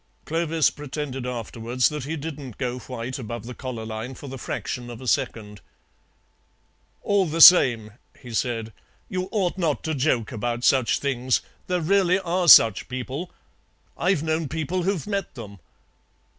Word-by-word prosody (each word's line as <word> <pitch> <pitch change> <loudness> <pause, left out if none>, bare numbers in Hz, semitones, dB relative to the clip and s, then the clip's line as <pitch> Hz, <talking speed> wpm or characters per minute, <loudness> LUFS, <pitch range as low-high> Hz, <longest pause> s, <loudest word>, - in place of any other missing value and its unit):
Clovis 165 -1 +1
pretended 140 -3 -5
afterwards 120 +1 -1
that 150 -4 -5
he 160 +3 -3
didn't 145 -5 -7
go 125 -1 -3
white 125 +1 -6
above 120 -2 -6
the 125 - -7
collar 120 -4 -6
line 110 +4 -6
for 140 - -10
the 135 -1 -7
fraction 120 0 -5
of 120 -2 -8
a 130 - -10
second. 105 -3 -2 1.4
"All 200 -2 +2
the 160 +2 -3
same," 120 -12 +8 0.3
he 125 -3 -10
said, 115 -1 -2 0.4
"you 185 0 -3
ought 190 -3 -1
not 160 -5 0
to 160 - -2
joke 130 -6 0
about 120 +1 -3
such 130 -3 +3
things. 130 -2 0 0.3
There 180 -1 0
really 185 +1 +3
are 180 -1 -1
such 115 - +7
people. 130 +7 -5 0.7
I've 180 -3 +1
known 160 0 -1
people 160 +3 -2
who've 185 -2 -1
met 200 -3 -3
them. 100 -5 -10
135 Hz, 155 wpm, -24 LUFS, 120-165 Hz, 1.4 s, same